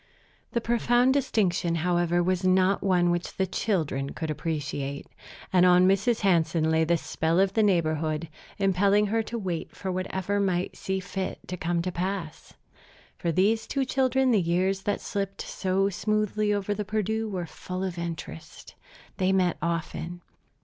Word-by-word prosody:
The 235 Hz, -, +1 dB
profound 240 Hz, +2 st, +3 dB
distinction, 195 Hz, -10 st, +1 dB
however, 175 Hz, 0 st, +2 dB
was 185 Hz, +1 st, 0 dB
not 185 Hz, +1 st, +3 dB
one 180 Hz, -3 st, +3 dB
which 175 Hz, 0 st, -3 dB
the 190 Hz, -, +2 dB
children 160 Hz, -8 st, -1 dB
could 160 Hz, -1 st, -3 dB
appreciate; 145 Hz, -3 st, -3 dB, 0.5 s
and 180 Hz, -1 st, +5 dB
on 180 Hz, 0 st, +6 dB
Mrs. 205 Hz, +5 st, +2 dB
Hansen 165 Hz, -4 st, +2 dB
lay 160 Hz, 0 st, +3 dB
the 170 Hz, +1 st, +2 dB
spell 165 Hz, +2 st, 0 dB
of 195 Hz, 0 st, +3 dB
the 220 Hz, -, +3 dB
neighborhood, 160 Hz, -5 st, +1 dB, 0.3 s
impelling 200 Hz, +1 st, +3 dB
her 225 Hz, +2 st, +1 dB
to 230 Hz, +2 st, -5 dB
wait 180 Hz, -6 st, -4 dB
for 190 Hz, -, -4 dB
whatever 190 Hz, +2 st, -2 dB
might 185 Hz, -2 st, 0 dB
see 190 Hz, 0 st, -2 dB
fit 190 Hz, 0 st, -4 dB
to 180 Hz, -, -4 dB
come 170 Hz, 0 st, -1 dB
to 185 Hz, -, -2 dB
pass. 175 Hz, -3 st, -4 dB, 0.6 s
For 170 Hz, -, 0 dB
these 210 Hz, +7 st, +2 dB
two 275 Hz, -1 st, 0 dB
children 265 Hz, 0 st, +2 dB
the 215 Hz, -4 st, +4 dB
years 185 Hz, +3 st, +1 dB
that 205 Hz, -, -1 dB
slipped 195 Hz, -1 st, -3 dB
so 190 Hz, +1 st, 0 dB
smoothly 215 Hz, +2 st, 0 dB
over 205 Hz, 0 st, 0 dB
the 210 Hz, +1 st, -3 dB
Perdu 215 Hz, +2 st, -1 dB
were 185 Hz, -4 st, -3 dB
full 185 Hz, +3 st, -6 dB
of 180 Hz, -2 st, -3 dB
interest. 165 Hz, -, -7 dB, 0.4 s
They 185 Hz, 0 st, +2 dB
met 185 Hz, -2 st, +2 dB
often. 170 Hz, +1 st, -3 dB
185 Hz, 160 wpm, -27 LUFS, 170-205 Hz, 0.6 s, on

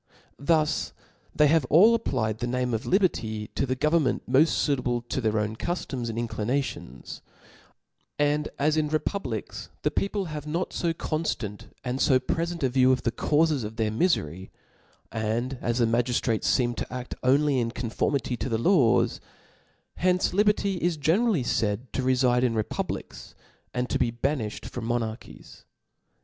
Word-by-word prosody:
Thus 155 Hz, +1 st, +1 dB, 0.4 s
they 150 Hz, -, +5 dB
have 150 Hz, -2 st, +3 dB
ajl 200 Hz, +10 st, +7 dB
applied 110 Hz, -, -1 dB
the 120 Hz, -, -2 dB
name 125 Hz, 0 st, -1 dB
of 110 Hz, -, -2 dB
liierfy 110 Hz, -, 0 dB
to -, -, -1 dB
the 130 Hz, -, 0 dB
government 150 Hz, 0 st, +1 dB
mpft 130 Hz, +4 st, +5 dB
fuitable 125 Hz, -6 st, 0 dB
to 130 Hz, -, -1 dB
their 110 Hz, -2 st, +1 dB
own 105 Hz, +1 st, -1 dB
cuilom^ 130 Hz, -5 st, -3 dB
and 115 Hz, -, -5 dB
inclinations: 120 Hz, -, -3 dB, 1.0 s
and 145 Hz, +1 st, +1 dB
as 150 Hz, +2 st, +2 dB
in 155 Hz, -1 st, +2 dB
republics, 150 Hz, -, -3 dB
the -, -, +1 dB
people 200 Hz, 0 st, -1 dB
have 150 Hz, -2 st, -6 dB
not 170 Hz, +4 st, -2 dB
ib 165 Hz, -1 st, 0 dB
conftant 120 Hz, -10 st, -3 dB
and 125 Hz, +1 st, -2 dB
fo 130 Hz, -3 st, +4 dB
prefent 170 Hz, +4 st, -2 dB
a 130 Hz, -, +3 dB
view 130 Hz, 0 st, +4 dB
of 130 Hz, -, 0 dB
the 120 Hz, -, +1 dB
caufes 150 Hz, +2 st, +1 dB
of 105 Hz, +1 st, -6 dB
their 110 Hz, -1 st, 0 dB
mjfery, 95 Hz, -, 0 dB, 0.6 s
and 115 Hz, +4 st, -2 dB
as 120 Hz, 0 st, -1 dB
the 120 Hz, -, +3 dB
magiitrates 115 Hz, -1 st, 0 dB
feem 120 Hz, -2 st, +2 dB
to -, -, -4 dB
aft 125 Hz, 0 st, -5 dB
only 140 Hz, +1 st, +3 dB
in 115 Hz, -1 st, 0 dB
conformity 125 Hz, +2 st, -1 dB
to 130 Hz, -, -3 dB
the 115 Hz, -, +1 dB
laws, 125 Hz, -, +3 dB, 0.8 s
hence 180 Hz, 0 st, +2 dB
li 200 Hz, +3 st, +4 dB
berty 200 Hz, -2 st, +1 dB
is 170 Hz, -1 st, 0 dB
generally 170 Hz, -, +2 dB
faid 115 Hz, +1 st, -1 dB
to -, -, -1 dB
refide 125 Hz, -1 st, +3 dB
in 120 Hz, -2 st, +1 dB
republics, 110 Hz, -1 st, -4 dB, 0.4 s
an4 125 Hz, 0 st, 0 dB
to -, -, 0 dB
be 115 Hz, -, +2 dB
banilhed 120 Hz, -3 st, -2 dB
from 120 Hz, -2 st, -5 dB
'monarchies. 115 Hz, -1 st, -5 dB
130 Hz, 160 wpm, -26 LUFS, 115-155 Hz, 1.0 s, ajl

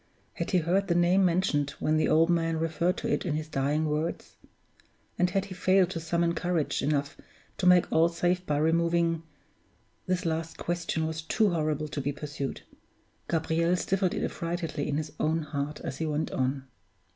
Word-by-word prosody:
Had -, -, -4 dB
he 185 Hz, -, +3 dB
heard 180 Hz, +4 st, +1 dB
the 170 Hz, -, +1 dB
name 175 Hz, +3 st, +4 dB
mentioned, 170 Hz, -5 st, +2 dB
when 155 Hz, -, +1 dB
the 155 Hz, -, +2 dB
old 160 Hz, +1 st, +5 dB
man 165 Hz, -1 st, +1 dB
referred 165 Hz, +2 st, 0 dB
to -, -, -3 dB
it -, -, 0 dB
in 165 Hz, -5 st, -1 dB
his 155 Hz, 0 st, -3 dB
dying 150 Hz, +2 st, 0 dB
words? 155 Hz, +2 st, -3 dB, 0.8 s
And 180 Hz, 0 st, +3 dB
had 195 Hz, +1 st, 0 dB
he 195 Hz, -, -8 dB
failed 185 Hz, 0 st, +3 dB
to 165 Hz, -, -3 dB
summon 170 Hz, +1 st, 0 dB
courage 175 Hz, -2 st, -1 dB
enough 145 Hz, 0 st, 0 dB, 0.4 s
to 180 Hz, -, +2 dB
make 180 Hz, -1 st, +6 dB
all 165 Hz, +1 st, +4 dB
safe 175 Hz, +2 st, 0 dB
by 150 Hz, -5 st, -1 dB
removing 165 Hz, +1 st, +2 dB, 0.9 s
This 185 Hz, -1 st, 0 dB
last 165 Hz, 0 st, -2 dB
question 170 Hz, -2 st, -2 dB
was 160 Hz, 0 st, -3 dB
too 210 Hz, +5 st, +2 dB
horrible 155 Hz, -2 st, -1 dB
to 145 Hz, -, -3 dB
be 140 Hz, +2 st, -1 dB
pursued; 145 Hz, -1 st, -5 dB, 0.7 s
Gabriel 165 Hz, +1 st, +1 dB
stifled 185 Hz, 0 st, 0 dB
it -, -, -2 dB
affrightedly 165 Hz, -3 st, -3 dB
in 145 Hz, -, -1 dB
his 155 Hz, -1 st, -3 dB
own 160 Hz, +1 st, +1 dB
heart 150 Hz, 0 st, -4 dB
as 135 Hz, -, -5 dB
he 160 Hz, -, -1 dB
went 155 Hz, +1 st, -1 dB
on. 130 Hz, +1 st, -1 dB
165 Hz, 180 wpm, -28 LUFS, 155-175 Hz, 0.9 s, make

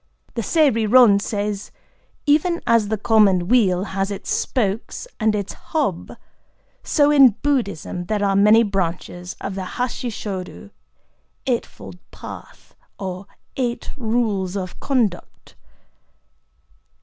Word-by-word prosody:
'"… -, -, -34 dB
The 235 Hz, -, -2 dB
Sei 305 Hz, -, +3 dB
Ri 220 Hz, -1 st, 0 dB
Ron 225 Hz, -3 st, +6 dB
says: 205 Hz, -1 st, -3 dB, 0.6 s
"Even 315 Hz, +4 st, +2 dB
as 230 Hz, -3 st, +3 dB
the 220 Hz, +1 st, -1 dB
common 200 Hz, -4 st, +3 dB
wheel 195 Hz, -6 st, +3 dB
has 195 Hz, -1 st, -2 dB
its 200 Hz, -, -5 dB
spokes 225 Hz, -, -2 dB
and 220 Hz, -1 st, +2 dB
its 200 Hz, -2 st, -3 dB
hub, 270 Hz, -, -3 dB, 0.7 s
so 290 Hz, -2 st, +3 dB
in 270 Hz, -7 st, +6 dB
Buddhism 200 Hz, -, -1 dB
there 205 Hz, +1 st, -1 dB
are 195 Hz, -1 st, +1 dB
many 210 Hz, +3 st, +6 dB
branches 180 Hz, -2 st, -3 dB
of 195 Hz, -, -4 dB
the 190 Hz, -1 st, -4 dB
Hasshi 250 Hz, 0 st, -2 dB
Shōdo 200 Hz, -2 st, -6 dB, 0.7 s
('Eight 245 Hz, -3 st, 0 dB
fold 95 Hz, -3 st, -12 dB
Path,' -, -, -11 dB, 0.2 s
or 190 Hz, 0 st, -6 dB, 0.3 s
eight 245 Hz, -3 st, -2 dB
rules 220 Hz, -7 st, -1 dB
of 185 Hz, -2 st, -6 dB
conduct)." 230 Hz, -10 st, -2 dB
210 Hz, 125 wpm, -21 LUFS, 195-245 Hz, 0.7 s, Ron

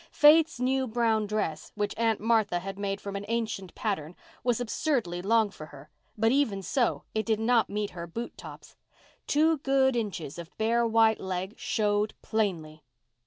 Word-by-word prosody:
Faith's 310 Hz, -1 st, +6 dB
new 260 Hz, +1 st, +1 dB
brown 220 Hz, -2 st, +1 dB
dress, 200 Hz, -7 st, -3 dB
which 205 Hz, -1 st, -1 dB
Aunt 225 Hz, -1 st, +1 dB
Martha 220 Hz, -4 st, +2 dB
had 195 Hz, +2 st, -6 dB
made 195 Hz, -1 st, -2 dB
from 200 Hz, -1 st, -6 dB
an 200 Hz, -, -4 dB
ancient 220 Hz, -5 st, -3 dB
pattern, 180 Hz, -6 st, -3 dB, 0.3 s
was 245 Hz, -1 st, +1 dB
absurdly 235 Hz, -, -1 dB
long 220 Hz, +1 st, +2 dB
for 155 Hz, -5 st, -10 dB
her, 145 Hz, +1 st, -14 dB, 0.3 s
but 225 Hz, +2 st, +3 dB
even 230 Hz, -8 st, +1 dB
so 245 Hz, +3 st, 0 dB
it 220 Hz, -, 0 dB
did 220 Hz, -1 st, 0 dB
not 230 Hz, 0 st, +2 dB
meet 210 Hz, 0 st, -2 dB
her 170 Hz, -1 st, -7 dB
boot 230 Hz, +8 st, -6 dB
tops. -, -, -11 dB, 0.5 s
Two 315 Hz, +1 st, +3 dB
good 270 Hz, -2 st, +2 dB
inches 185 Hz, -9 st, -3 dB
of 170 Hz, -1 st, -8 dB
bare 230 Hz, +2 st, +2 dB
white 225 Hz, -1 st, +4 dB
leg 190 Hz, +1 st, -4 dB
showed 210 Hz, 0 st, 0 dB
plainly. 165 Hz, -8 st, -2 dB
220 Hz, 165 wpm, -28 LUFS, 195-235 Hz, 0.5 s, Faith's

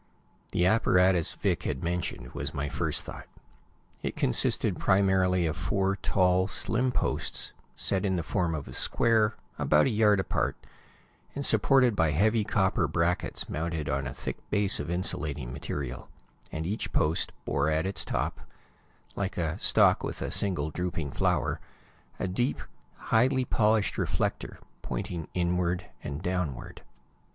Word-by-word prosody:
The 90 Hz, -, +2 dB
apparatus 95 Hz, -4 st, +3 dB
Vic -, -, -1 dB
had 65 Hz, -, -3 dB
mentioned 85 Hz, -8 st, -3 dB
was 75 Hz, +3 st, -5 dB
my 70 Hz, 0 st, -2 dB
first -, -, -1 dB
thought. -, -, -9 dB, 0.7 s
It -, -, -3 dB
consisted 65 Hz, -, +2 dB
primarily 95 Hz, -2 st, +3 dB
of 80 Hz, 0 st, -1 dB
four 95 Hz, +2 st, 0 dB
tall, 95 Hz, -1 st, +2 dB
slim 125 Hz, +5 st, +1 dB
posts, -, -, -1 dB, 0.2 s
set 95 Hz, 0 st, 0 dB
in 95 Hz, -2 st, +1 dB
the 85 Hz, -, -1 dB
form 85 Hz, -1 st, -1 dB
of 75 Hz, -3 st, -6 dB
a 65 Hz, -, -9 dB
square, 110 Hz, -, +2 dB, 0.2 s
about 75 Hz, -, +4 dB
a 130 Hz, -, +1 dB
yard 105 Hz, -2 st, +4 dB
apart, 65 Hz, -8 st, -1 dB, 0.8 s
and 140 Hz, 0 st, -1 dB
supported 130 Hz, -5 st, +4 dB
by 80 Hz, -4 st, +3 dB
heavy 105 Hz, +9 st, +2 dB
copper 95 Hz, -5 st, +1 dB
brackets 85 Hz, +3 st, -1 dB
mounted 80 Hz, -1 st, -3 dB
on 65 Hz, 0 st, -1 dB
a 60 Hz, -, -5 dB
thick -, -, -4 dB
base 100 Hz, -1 st, +2 dB
of -, -, -4 dB
insulating 75 Hz, -7 st, -1 dB
material, 65 Hz, -2 st, -5 dB, 0.4 s
and 80 Hz, 0 st, -4 dB
each 105 Hz, +6 st, -3 dB
post 80 Hz, +2 st, +1 dB
bore 70 Hz, +3 st, +1 dB
at 80 Hz, +2 st, +1 dB
its 95 Hz, -, -2 dB
top, -, -, -2 dB, 0.8 s
like 95 Hz, -2 st, -3 dB
a 80 Hz, -3 st, -2 dB
stalk -, -, +4 dB
with -, -, -4 dB
a -, -, -3 dB
single 85 Hz, -7 st, +1 dB
drooping 85 Hz, -4 st, -3 dB
flower, -, -, 0 dB, 0.6 s
a -, -, -2 dB
deep, 120 Hz, +9 st, -1 dB, 0.4 s
highly 130 Hz, +3 st, +2 dB
polished 110 Hz, -2 st, +1 dB
reflector, -, -, -2 dB, 0.2 s
pointing 85 Hz, -3 st, -4 dB
inward 90 Hz, 0 st, 0 dB, 0.2 s
and 70 Hz, +4 st, -5 dB
downward. 90 Hz, -8 st, -3 dB
90 Hz, 145 wpm, -28 LUFS, 80-100 Hz, 0.8 s, about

